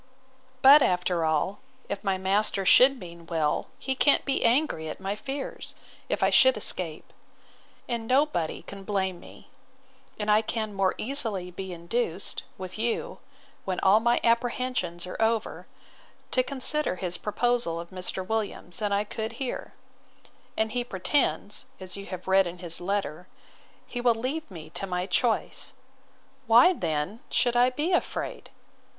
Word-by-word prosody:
But, 280 +3 +10
after 180 -4 +1
all, 160 +5 0 0.3
if 200 - -4
my 195 -2 +1
master 195 +1 +1
should 265 +7 +7
mean 170 -3 -11
well, 160 -3 0
he 265 - -2
can't 285 +2 +3
be 275 - 0
angry 235 - +2
at - - -7
my 195 +1 -3
fears, 270 +5 -5 0.3
if - - 0
I - - +4
should - - +6
escape; - - -2 0.7
and 235 -2 -3
nobody 255 - +1
can 195 -1 -9
blame 190 -3 -1
me; - - -15 0.7
and 210 0 0
I 210 +1 +5
can 220 -1 -3
more 195 -1 +1
easily 220 -8 -2
be 190 +1 -6
induced, 175 +2 -2 0.2
with 185 +2 -7
you, 240 - -2 0.4
when 185 -2 -2
all 195 +3 +6
my 235 +1 +2
apprehensions 235 -7 0
are 180 - -6
over, 225 -1 0 0.6
to 255 - +3
consider 275 - 0
his 180 -1 -4
proposal 230 -5 0
of 170 +1 -8
Mr. 185 0 -3
Williams, 210 -5 -3
than 210 -2 -1
I 200 +1 +2
could 220 +2 -5
here; 255 +1 -5 0.8
and 220 0 +1
he 245 +1 -1
pretends, 210 0 0
as 185 -1 -5
you 200 0 -8
have 185 -1 -7
read 190 -1 +4
in 175 +1 -7
his 175 -1 -7
letter, 180 -3 -2 0.6
he 245 - -5
will 240 -1 +4
leave 265 +7 -3
me 160 -4 -10
to 195 - -3
my 180 0 -1
choice: 225 +4 0 0.7
Why 240 +11 +7
then 160 - -2
should 245 -1 +2
I 245 +1 +5
be 295 +7 -2
afraid? - - -2
205 Hz, 155 wpm, -27 LUFS, 180-245 Hz, 0.8 s, But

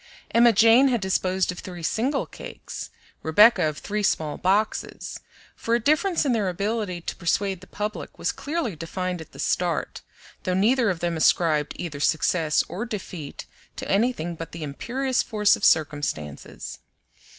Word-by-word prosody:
Emma 235 +1 +6
Jane 230 +5 +6
had 245 -3 +2
disposed 190 -1 0
of 180 - -8
three 175 -3 -8
single 260 - 0
cakes, - - -8 0.3
Rebecca 185 +1 +5
of 150 - -7
three 210 +1 -3
small 155 -6 0
boxes; 200 +4 -1 0.4
for 230 - 0
a - - +2
difference 310 - +2
in 275 - +2
their 210 -5 +1
ability 200 -1 -2
to - - -5
persuade 190 +1 -1
the 190 - -13
public 210 +1 -5
was - - 0
clearly 300 - -3
defined 180 +2 -4
at 160 - -12
the - - -14
start, - - -1 0.4
though 185 - -1
neither 230 +4 +3
of 180 -4 -2
them 170 -1 -1
ascribed 155 -2 +2
either 150 -5 -5
success 160 +1 +2
or 200 - -4
defeat 185 - -6 0.3
to - - -6
anything 195 -5 +1
but 165 0 -8
the 165 -1 -6
imperious 250 - -1
force 210 -1 +3
of - - -11
circumstances. 145 - 0
190 Hz, 160 wpm, -25 LUFS, 165-230 Hz, 0.4 s, Emma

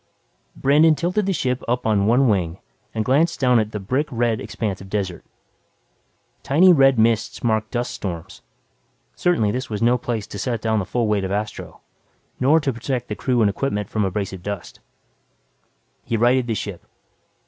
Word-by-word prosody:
Brandon 155 +3 +4
tilted 180 +7 -1
the - - +2
ship 125 -8 -1
up 125 +1 -1
on 105 -2 +2
one 125 +4 +4
wing 90 -5 0 0.3
and 110 -1 -2
glanced 155 +6 +2
down 125 -3 +4
at 110 -1 -1
the 105 - -4
brick 130 +10 -1
red 115 -2 0
expanse 105 -4 -4
of 95 - -11
desert. 95 -4 -3 1.2
Tiny 180 +6 +5
red 135 -4 +5
mists 115 0 +1
marked 110 -2 0
dust 120 0 -2
storms. 85 -4 -6 0.7
Certainly 165 -13 +1
this 130 +2 -4
was 105 -2 -3
no 120 +2 +3
place 115 -4 -3
to 100 - -8
set 120 +2 -2
down 110 0 0
the 95 - -3
full 120 +3 -1
weight 105 -2 +1
of 95 - -3
Astro 105 +1 -4 0.6
nor 145 +5 +4
to 135 -2 -1
protect 125 +2 -4
the 105 - -3
crew 125 0 0
and 105 - +4
equipment 105 -4 -2
from 110 - -1
abrasive 95 -1 -3
dust. 100 -1 -6 1.2
He 115 - -1
righted 120 +2 +3
the 115 - -1
ship. 100 -4 -5
115 Hz, 175 wpm, -22 LUFS, 105-130 Hz, 1.2 s, Tiny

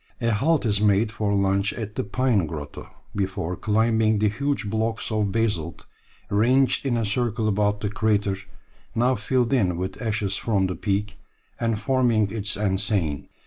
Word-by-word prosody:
A 115 -2 +1
halt 140 +7 +2
is 105 -2 +2
made 105 +1 +3
for 110 -3 -1
lunch 100 +1 +1
at 110 -2 -6
the - - -2
Pine 105 -4 +1
grotto 75 -2 -7 0.3
before 95 -3 -2
climbing 110 +1 +2
the 105 0 +2
huge 140 +1 -1
blocks 110 +2 -1
of 105 -2 0
basalt 100 -7 -1 0.5
ranged 125 +6 +3
in 120 -3 +1
a 115 - 0
circle 110 +1 0
about 105 0 +1
the 105 - -1
crater, 105 -2 +1 0.6
now 125 +3 +3
filled 125 +3 0
in 90 -9 +2
with 95 +4 -4
ashes 105 -4 -1
from 100 -4 +1
the 90 -1 -2
peak, 100 0 -2 0.4
and 115 -2 0
forming 115 -4 +2
its 110 -1 -2
enceinte. 95 -7 -1
105 Hz, 160 wpm, -24 LUFS, 100-115 Hz, 0.6 s, made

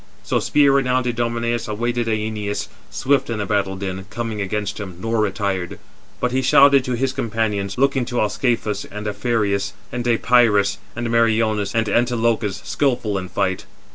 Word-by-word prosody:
So - - 0
spear 145 -2 +3
renowned 130 -2 +2
Idomeneus 120 0 -1
awaited 120 +2 -1
Æneas, 105 -2 -2 0.2
swift 135 -1 +1
in 115 - -2
the 105 - -2
battle 100 -1 0
din, 95 0 -5
coming 110 -1 -4
against 105 +2 -3
him, 95 -4 -7
nor 115 +3 -1
retired; 100 -3 -1 0.4
but 125 - 0
he 130 +1 +1
shouted 140 +1 +6
to 125 - -1
his 130 +2 0
companions, 105 -5 -2
looking 135 -1 +2
to 120 +1 -2
Ascalaphus, 105 -1 0
and 105 +1 -8
Aphareus, 100 -2 0 0.2
and 120 0 -3
Deïpyrus, 115 -4 +3 0.2
and 120 +1 -3
Meriones, 110 -3 +2
and 115 -1 +1
Antilochus, 115 -2 +1
skilful 120 -8 0
in 90 -1 -7
fight. 95 -2 -1
115 Hz, 155 wpm, -21 LUFS, 100-120 Hz, 0.4 s, shouted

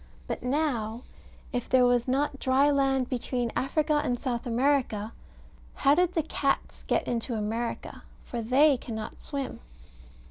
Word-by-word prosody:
But - - -4
now 250 -4 -1 0.5
If 245 -1 -2
there 255 -1 +5
was 245 0 +2
not 275 +2 0
dry 270 +3 +3
land 270 -2 +2
between 245 -1 -2
Africa 300 +2 +1
and 245 -1 -1
South 245 -1 -3
America, 240 -4 +1 0.6
how 275 0 +4
did 360 +3 +2
the 325 - +1
cats 280 -2 -1
get - - 0
into 235 0 -2
America? 225 +2 -3 0.2
For 240 - -4
they 270 +5 +4
cannot 220 -3 -6
swim. 275 -3 -4
255 Hz, 140 wpm, -28 LUFS, 235-280 Hz, 0.6 s, there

